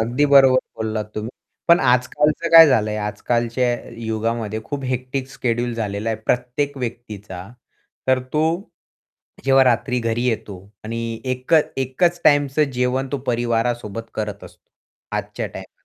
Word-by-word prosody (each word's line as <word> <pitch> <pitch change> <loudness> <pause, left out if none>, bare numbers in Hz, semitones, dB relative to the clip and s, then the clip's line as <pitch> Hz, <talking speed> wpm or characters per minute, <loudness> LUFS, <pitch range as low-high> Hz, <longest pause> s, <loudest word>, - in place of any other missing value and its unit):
अगदी 120 +6 +1
बरोबर 135 -2 +6 0.2
बोललात 110 -1 -2
तुम्ही. 110 +2 -4 0.4
पण 170 +1 +7
आजकालचं 145 +6 +2
काय 165 -1 +10
झालंय, 110 -4 +1
आजकालच्या 120 +3 -1 0.4
युगामध्ये 110 -1 -2
खूप 145 -2 -5
हेक्टिक 130 +1 -3
शेड्यूल 120 -1 -1
झालेलं 105 -1 -3
आहे 110 - -1
प्रत्येक 125 +4 -1
व्यक्तीचा. 105 -6 -6 0.6
तर 130 0 +4
तो 155 +1 +2 1.0
जेव्हा 135 0 +5
रात्री 125 0 +1
घरी 115 0 -1
येतो 110 -4 -2 0.3
आणि 115 0 -4
एकच 130 +5 +1
एकच 170 +7 +1
टाईमचं 145 0 +4
जेवण 125 +2 0
तो 140 - 0
परिवारासोबत 115 -2 -1
करत 105 -2 -4
असतो, - - -17 0.5
आजच्या - - -4
टाईमाला. - - -12
125 Hz, 130 wpm, -21 LUFS, 115-135 Hz, 1.0 s, काय